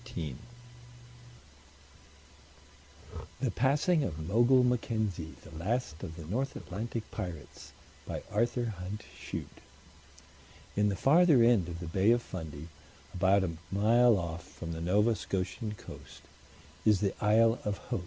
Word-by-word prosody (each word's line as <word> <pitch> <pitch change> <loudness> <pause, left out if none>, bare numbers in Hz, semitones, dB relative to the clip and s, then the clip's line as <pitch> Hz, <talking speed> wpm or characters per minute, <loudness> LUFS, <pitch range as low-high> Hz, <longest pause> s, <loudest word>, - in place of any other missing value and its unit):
THE - - 0
PASSING 145 +5 +2
OF 80 - -4
MOGUL 120 +6 +5
MACKENZIE 110 -9 -1
The 80 - -12
Last 115 -6 -2
of 80 - -6
the 80 -2 -9
North 125 - -2
Atlantic 110 +4 -5
Pirates 80 -7 -7 0.6
ARTHUR 120 +1 0
HUNT 100 +4 -6
CHUTE - - -7 1.1
In 105 0 +3
the 100 - -1
farther 150 - +5
end 115 -8 +4
of 85 -1 -6
the 90 - -6
Bay 95 +5 +2
of 120 0 +4
Fundy, 80 -4 -7 0.5
about 95 +2 +3
a 90 - -1 0.2
mile 115 +3 +5
off 85 -1 -4
from 85 0 -8
the 80 0 -5
Nova 105 +6 +3
Scotian 105 +3 -3
coast, - - -12 0.6
is 105 -3 +4
the 100 -2 +1
Isle 115 +2 +4
of 105 -1 -2
Haut. 120 -4 -4
105 Hz, 125 wpm, -31 LUFS, 90-120 Hz, 1.1 s, MOGUL